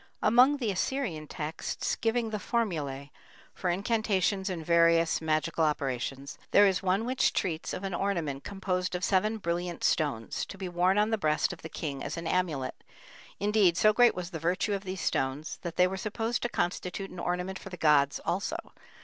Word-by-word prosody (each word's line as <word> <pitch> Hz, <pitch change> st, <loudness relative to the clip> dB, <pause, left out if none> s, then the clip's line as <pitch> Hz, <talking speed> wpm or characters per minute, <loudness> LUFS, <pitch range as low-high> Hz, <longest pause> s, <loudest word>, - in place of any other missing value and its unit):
Among 250 Hz, +6 st, +6 dB
the 235 Hz, -6 st, -1 dB
Assyrian 185 Hz, -, -2 dB
texts 155 Hz, +2 st, -3 dB
giving 225 Hz, 0 st, 0 dB
the 215 Hz, -, -2 dB
formulæ 150 Hz, -, -2 dB, 0.4 s
for 180 Hz, -, -2 dB
incantations 200 Hz, 0 st, +1 dB
and 170 Hz, -4 st, -4 dB
various 165 Hz, 0 st, +4 dB
magical 155 Hz, 0 st, 0 dB
operations, 135 Hz, -2 st, -2 dB
there 205 Hz, -, +6 dB
is 190 Hz, -2 st, +2 dB
one 195 Hz, +3 st, +1 dB
which 255 Hz, +1 st, +1 dB
treats 165 Hz, -4 st, -2 dB
of 185 Hz, -, -5 dB
an 195 Hz, -1 st, -3 dB
ornament 170 Hz, -8 st, -1 dB
composed 185 Hz, -2 st, -2 dB
of 180 Hz, -, -3 dB
seven 210 Hz, +4 st, +2 dB
brilliant 175 Hz, -2 st, -3 dB
stones, 135 Hz, -8 st, 0 dB
to 195 Hz, -, -9 dB
be 190 Hz, -1 st, -4 dB
worn 180 Hz, +2 st, +2 dB
on 210 Hz, +2 st, +3 dB
the 220 Hz, -, +1 dB
breast 155 Hz, -1 st, +1 dB
of 175 Hz, -, -12 dB
the 160 Hz, -, -7 dB
king 140 Hz, -4 st, -4 dB
as 150 Hz, -, -4 dB
an 165 Hz, -, -5 dB
amulet; 165 Hz, -7 st, -1 dB, 0.6 s
indeed, 205 Hz, -4 st, +3 dB
so 215 Hz, 0 st, +5 dB
great 240 Hz, +1 st, +5 dB
was 180 Hz, 0 st, -5 dB
the 165 Hz, -, -5 dB
virtue 180 Hz, +6 st, 0 dB
of 200 Hz, 0 st, -3 dB
these 185 Hz, 0 st, -4 dB
stones 135 Hz, +4 st, -1 dB
that 170 Hz, -2 st, -5 dB
they 180 Hz, -, +5 dB
were 190 Hz, +1 st, -2 dB
supposed 225 Hz, +4 st, -2 dB
to 240 Hz, -, -1 dB
constitute 180 Hz, 0 st, -2 dB
an 180 Hz, -, -8 dB
ornament 180 Hz, +2 st, -2 dB
for -, -, -9 dB
the 180 Hz, -, -8 dB
gods 145 Hz, -3 st, +3 dB
also. 195 Hz, -, -1 dB
180 Hz, 185 wpm, -29 LUFS, 160-205 Hz, 0.6 s, Among